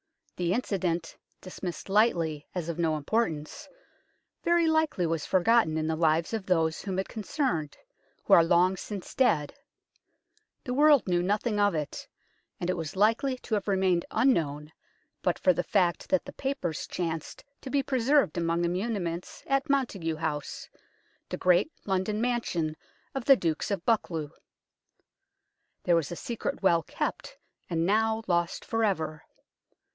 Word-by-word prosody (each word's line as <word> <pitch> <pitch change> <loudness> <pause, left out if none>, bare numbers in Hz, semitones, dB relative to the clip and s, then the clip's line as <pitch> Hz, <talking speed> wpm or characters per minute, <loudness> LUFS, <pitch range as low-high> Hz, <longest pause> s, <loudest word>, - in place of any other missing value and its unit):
The 175 0 0
incident, 185 -8 -1 0.3
dismissed 180 -2 -6
lightly 170 -8 +1
as 175 -3 -3
of 170 - -4
no 160 -2 +1
importance, 170 - -2 0.7
very 340 0 +3
likely 315 - +2
was 165 -2 -2
forgotten 185 -3 +3
in 155 - -1
the 160 0 0
lives 160 +3 +1
of 215 -4 -3
those 165 -3 +1
whom 190 -2 -4
it 190 - -1
concerned, 210 - -2 0.5
who - - +2
are 170 - +8
long 175 +3 +3
since 195 0 -7
dead: 190 - +2 1.1
the 250 - -3
world 290 -2 +5
knew 175 -1 +2
nothing 205 +3 0
of 205 -3 +3
it, 150 -2 -4 0.5
and 175 - -3
it 185 - +1
was 160 0 -5
likely 230 +7 +2
to 245 - -7
have 205 -2 0
remained 190 -3 +2
unknown 155 - +1 0.5
but - - +1
for 185 - +4
the 175 - 0
fact 180 +1 0
that 280 -1 +2
the 280 - -9
papers 265 - -3
chanced 165 -3 -4 0.2
to 265 - -7
be 275 0 +1
pre 265 -1 -1
served 265 - +3
among 170 0 0
the 170 - +1
muniments 180 -3 -3
at 275 0 0
Montagu 200 - 0
House, 155 -2 -4 0.6
the - - -3
great 180 - +3
London 195 +2 0
mansion 220 -10 -1 0.4
of 270 -3 -4
the 275 - +8
Dukes 165 -9 -1
of 195 -4 -2
Buccleuch. 165 -10 0 1.5
There 175 - +3
was 165 -3 0
a - - -3
secret 230 +1 -4
well 170 -3 +4
kept, - - -4 0.3
and 165 -1 0
now 220 +3 +2
lost 175 -1 0
for 225 -1 0
ever. 160 -7 -1
185 Hz, 155 wpm, -28 LUFS, 165-230 Hz, 1.5 s, are